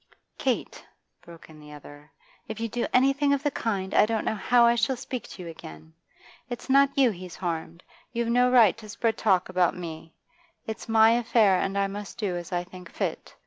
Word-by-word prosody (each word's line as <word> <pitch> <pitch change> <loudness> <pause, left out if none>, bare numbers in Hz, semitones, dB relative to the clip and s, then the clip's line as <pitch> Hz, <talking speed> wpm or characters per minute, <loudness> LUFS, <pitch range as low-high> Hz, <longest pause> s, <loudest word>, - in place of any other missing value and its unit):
'Kate,' - - -2 0.4
broke 170 -1 -14
in 155 -1 -15
the 150 0 -13
other, 145 0 -13 0.4
'if 220 0 -6
you 230 - -2
do 235 +2 -2
anything 275 +2 +3
of 280 0 -1
the 290 - 0
kind, 195 -7 -3
I 210 - +5
don't 225 -1 -2
know - - 0
how 235 +3 +3
I 235 - +5
shall 235 +3 0
speak 250 -1 -6
to 185 - -10
you - - -8
again. 80 - -11 0.6
Its 245 +2 -5
not 275 +1 +4
you 260 -4 +4
he's 180 -2 -9
harmed; 170 -1 -5 0.3
you've 235 -1 -2
no 245 +1 +3
right 235 -6 +5
to 215 -1 -12
spread 225 +1 -1
talk 190 -4 +2
about 180 -1 +1
me 165 -2 -8 0.5
It's 220 +1 -7
my 225 0 +6
affair, 225 -5 +3
and 195 +1 -2
I 200 - +2
must 200 +1 -7
do 200 -5 -2
as 175 -1 -7
I 175 -1 -1
think 180 0 -13
fit. - - -4
210 Hz, 205 wpm, -26 LUFS, 175-235 Hz, 0.6 s, my